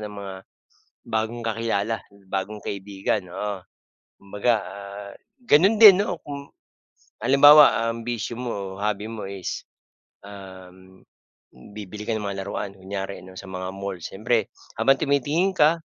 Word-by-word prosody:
ng 105 - -11
mga 95 -1 -7 0.8
bagong 110 +2 -1
kakilala, 115 -1 -1 0.3
bagong 100 +2 -3
kaibigan, 100 0 -3
oo. 100 +1 -3 0.6
Kumbaga 105 +4 0
ah, 100 0 -9 0.4
gano'n 195 +9 +5
din 205 -2 +9
'no 175 -4 -4
kung, 140 -1 -8 0.7
halimbawa 140 -2 +7
ang 115 0 -3
bisyo 120 0 -3
mo, 100 -6 -5
hobby 105 0 -1
mo, 115 -1 -6
is, 95 -2 -5 0.6
um, 95 -2 -13 0.7
bibili 105 0 -8
ka 115 - -2
ng 110 - -1
mga 100 -1 -4
laruan, 100 -1 -5
kunyari, 95 -1 -6
'no, 95 - -12
sa 95 - -12
mga 95 0 -5
mall, 100 -1 -5
siyempre 110 +4 -1 0.2
habang 135 0 +3
tumitingin 150 +7 +1
ka 160 +3 +4
105 Hz, 130 wpm, -24 LUFS, 95-120 Hz, 0.8 s, din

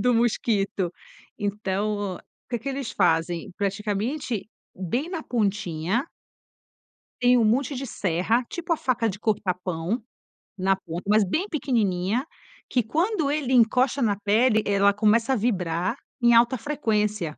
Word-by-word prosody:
do 245 -1 +3
mosquito. 205 -6 0 0.5
Então, 205 -1 -2 0.3
que 240 - 0
que 275 - -6
eles 270 -4 -3
fazem? 170 +1 +1
Praticamente, 210 +4 -2 0.3
bem 240 - -2
na 335 -4 -4
pontinha 205 - -1 1.1
tem 250 0 +5
um 230 - +4
monte 260 +6 +1
de 270 +2 -4
serra, 205 +4 0
tipo 345 -1 -1
a - - -2
faca 245 -3 0
de 200 +2 -6
cortar 205 -5 0
pão, 180 +6 -2 0.6
na 190 +1 +2
ponta, 170 -2 -7
mas 210 0 +5
bem 335 - -1
pequenininha, 230 - 0 0.4
que 250 - +2
quando 320 - 0
ele 290 -4 -1
encosta 250 +3 +3
na 205 -3 +2
pele, 215 +2 +3
ela 200 0 +4
começa 220 +4 +3
a 260 - +2
vibrar 185 -2 0 0.3
em 235 0 +6
alta 240 +2 +5
frequência. 215 -8 0
220 Hz, 140 wpm, -25 LUFS, 195-250 Hz, 1.1 s, em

